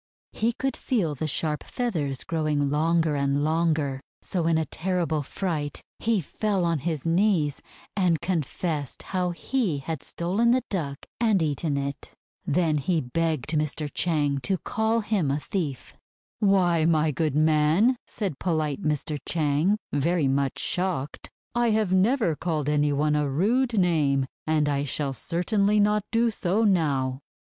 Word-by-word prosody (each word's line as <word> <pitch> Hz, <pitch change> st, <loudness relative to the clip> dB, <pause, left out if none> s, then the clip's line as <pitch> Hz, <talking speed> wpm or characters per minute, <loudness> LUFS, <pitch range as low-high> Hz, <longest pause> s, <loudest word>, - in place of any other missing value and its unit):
He 230 Hz, +2 st, 0 dB
could 270 Hz, +3 st, -2 dB
feel 200 Hz, -, 0 dB
the 150 Hz, +3 st, -3 dB
sharp 150 Hz, +1 st, -1 dB
feathers 155 Hz, -, -2 dB
growing 150 Hz, -3 st, 0 dB
longer 160 Hz, +1 st, +2 dB
and 140 Hz, 0 st, +1 dB
longer, 155 Hz, -4 st, +1 dB, 0.2 s
so 170 Hz, -3 st, -1 dB
in 165 Hz, -1 st, +3 dB
a 160 Hz, -, 0 dB
terrible 170 Hz, -1 st, -1 dB
fright 150 Hz, -1 st, -3 dB, 0.2 s
he 220 Hz, -3 st, +1 dB
fell 195 Hz, +3 st, -1 dB
on 165 Hz, -2 st, +1 dB
his 155 Hz, 0 st, -3 dB
knees, 165 Hz, -4 st, +2 dB, 0.3 s
and 180 Hz, -5 st, +2 dB
confessed 160 Hz, -4 st, -2 dB
how 180 Hz, -2 st, -1 dB
he 185 Hz, -, -1 dB
had 145 Hz, +1 st, -5 dB
stolen 190 Hz, +11 st, 0 dB
the 255 Hz, +1 st, +3 dB
Duck 145 Hz, -8 st, -2 dB, 0.2 s
and 220 Hz, -4 st, +3 dB
eaten 150 Hz, -1 st, -1 dB
it. 140 Hz, 0 st, -5 dB, 0.3 s
Then 155 Hz, -1 st, +2 dB
he 165 Hz, +4 st, +1 dB
begged 155 Hz, +2 st, -1 dB
Mr. 150 Hz, -1 st, -1 dB
Chang 145 Hz, -5 st, +1 dB
to 185 Hz, +9 st, 0 dB
call 225 Hz, +2 st, 0 dB
him 205 Hz, -8 st, 0 dB
a 140 Hz, +2 st, 0 dB
thief. 150 Hz, -6 st, -4 dB, 0.4 s
"Why, 180 Hz, -5 st, +3 dB
my 160 Hz, -1 st, +3 dB
good 150 Hz, 0 st, -1 dB
man," 155 Hz, -, +4 dB
said 190 Hz, -, -3 dB
polite 155 Hz, -5 st, -1 dB
Mr. 150 Hz, 0 st, -1 dB
Chang, 160 Hz, +5 st, +2 dB, 0.2 s
very 150 Hz, +1 st, +1 dB
much 135 Hz, 0 st, 0 dB
shocked, 175 Hz, -6 st, -2 dB, 0.2 s
'I 240 Hz, -1 st, +2 dB
have 215 Hz, -4 st, +1 dB
never 195 Hz, -, +3 dB
called 155 Hz, -3 st, -2 dB
any 150 Hz, 0 st, +2 dB
one 150 Hz, +1 st, +1 dB
a 150 Hz, -1 st, +1 dB
rude 225 Hz, -, +1 dB
name, 150 Hz, -7 st, +2 dB, 0.2 s
and 155 Hz, -1 st, +2 dB
I 140 Hz, -1 st, 0 dB
shall 140 Hz, 0 st, -2 dB
certainly 200 Hz, -, +1 dB
not 210 Hz, +1 st, +3 dB
do 230 Hz, 0 st, +2 dB
so 200 Hz, +1 st, 0 dB
now.' 140 Hz, -10 st, +1 dB
160 Hz, 150 wpm, -26 LUFS, 145-190 Hz, 0.4 s, man